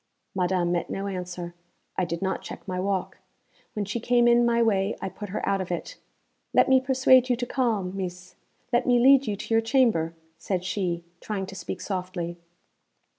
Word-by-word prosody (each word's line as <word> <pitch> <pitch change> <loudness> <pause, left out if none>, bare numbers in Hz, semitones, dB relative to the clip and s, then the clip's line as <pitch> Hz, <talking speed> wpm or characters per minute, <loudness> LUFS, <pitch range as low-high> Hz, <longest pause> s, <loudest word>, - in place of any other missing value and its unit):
Madame 180 -2 +1
met 175 -1 -1
no 195 - -3
answer. 180 -2 -5 0.4
I 185 - +1
did 170 +2 -4
not 190 0 -1
check - - -9
my 185 -1 -2
walk. 190 0 -2 0.5
When 210 -1 -2
she 210 +4 -3
came 240 +1 +3
in 240 0 +5
my 235 0 +2
way 200 -2 +1
I - - -3
put 205 +2 -8
her 195 - -3
out 195 -1 +1
of 180 - -5
it. - - -4 0.6
'Let - - +6
me 265 -1 +5
persuade 260 -1 +4
you 245 - +3
to 245 +1 -3
calm, 225 -8 0
Meess; 180 -1 -6 0.4
let 240 +2 +2
me 245 -1 +5
lead 265 +1 +6
you 210 - 0
to 225 - -4
your 225 - +5
chamber,' 225 - +2 0.2
said 185 -3 -2
she, 180 -3 -2 0.2
trying 200 -1 -3
to 190 0 -10
speak 185 0 -6
softly. 180 -3 -4
195 Hz, 190 wpm, -26 LUFS, 180-235 Hz, 0.6 s, Let